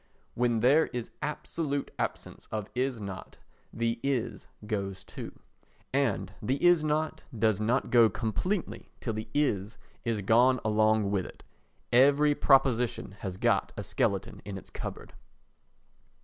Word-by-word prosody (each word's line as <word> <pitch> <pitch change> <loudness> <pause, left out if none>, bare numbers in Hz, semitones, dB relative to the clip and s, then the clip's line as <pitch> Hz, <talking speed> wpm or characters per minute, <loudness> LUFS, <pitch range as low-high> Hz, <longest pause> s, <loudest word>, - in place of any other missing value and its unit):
When 120 -2 +1
there 145 +7 +5
is 120 -2 -5
absolute 150 -1 -3
absence - - -4
of 105 -1 -4
"Is 125 -1 -1
not" 100 -2 -7 0.3
the 115 0 -1
"Is" 125 -5 -2 0.2
goes 100 -3 -3
too. - - -8 0.6
And 110 -8 0
the 130 +2 0
"Is 175 -3 +6
not" 155 +1 -1 0.2
does 110 -1 +2
not 120 +5 +1
go 120 -3 +7
completely 120 - -2
till 115 - -3
the 110 +1 -5
"Is" 110 -8 0 0.3
is 110 -3 -1
gone 125 +5 +4
along 110 -1 +3
with 95 -3 0
it. - - -14 0.5
Every 145 +4 +5
proposition 125 -7 +2
has 95 -2 -5
got - - +1
a - - -3
skeleton - - -1
in 100 -1 -6
its - - -11
cupboard. - - -7
115 Hz, 135 wpm, -29 LUFS, 105-140 Hz, 0.6 s, go